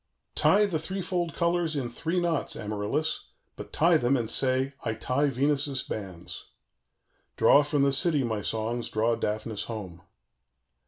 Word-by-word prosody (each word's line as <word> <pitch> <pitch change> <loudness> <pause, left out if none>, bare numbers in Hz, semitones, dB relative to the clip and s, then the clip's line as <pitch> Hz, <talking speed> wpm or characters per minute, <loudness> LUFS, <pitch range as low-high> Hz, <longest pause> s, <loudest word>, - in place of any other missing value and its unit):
_ - - -53
"Tie 210 +1 +4
the 175 -6 -1
threefold 175 -1 -3
colors 170 -2 +1
in 135 -4 -1
three 165 +8 -2
knots, 170 -3 -1
Amaryllis, 105 +10 -2 0.3
but - - -9
tie 170 +1 +4
them; 125 0 +2
and 115 -2 -2
say, 130 +3 +1
'I 110 - -2
tie 130 +6 0
Venus's 140 0 +1
bands.' 95 -5 -7 0.9
"_Draw 145 - +6
from 145 -1 +1
the 140 - +3
city, 145 0 +4
my 110 -3 -2
songs, 115 +3 -2
draw 110 +2 +1
Daphnis 110 -1 -3
home. 95 -7 -7
135 Hz, 150 wpm, -27 LUFS, 110-160 Hz, 0.9 s, Draw